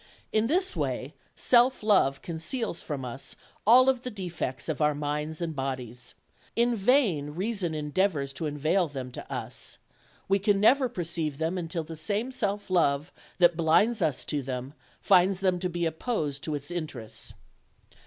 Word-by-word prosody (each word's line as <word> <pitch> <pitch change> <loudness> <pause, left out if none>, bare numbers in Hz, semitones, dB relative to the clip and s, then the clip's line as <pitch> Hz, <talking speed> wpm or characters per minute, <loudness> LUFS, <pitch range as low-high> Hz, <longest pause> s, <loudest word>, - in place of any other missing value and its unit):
In 220 +1 +3
this 370 +6 +1
way - - -2 0.2
self 250 0 +4
love 185 -11 +3
conceals 170 +5 -3
from 140 -4 -4
us 125 +2 -6 0.3
all 250 +3 +8
the 250 0 -7
defects 175 - -4
of 155 -2 -2
our 150 -1 +3
minds 150 +2 -3
and 165 -2 -3
bodies. 125 -3 -5 0.4
In 235 +1 +3
vain 195 - +2
reason 190 -3 -1
en 150 -1 -4
deavors 150 -7 +1
to 155 +4 -3
unveil 155 +5 +1
them 130 -3 -6
to - - -9
us: - - -4 0.5
we 195 +1 +3
can 200 0 +2
never 255 +5 +5
perceive 165 - -2
them 160 +3 -1
until 165 -2 -3
the 160 +1 -8
same 205 +10 -2
self 205 -5 -2
love 150 -3 +2 0.2
that 175 -2 +5
blinds 185 +8 +3
us 155 -6 0
to 145 -2 -1
them 130 +1 -5 0.3
finds 185 +1 +4
them 185 -2 +1
to 180 0 -1
be 175 0 -1
opposed 160 - -2
to 155 - -2
its 145 +3 -6
interests." 150 -10 -5
170 Hz, 165 wpm, -28 LUFS, 145-205 Hz, 0.5 s, all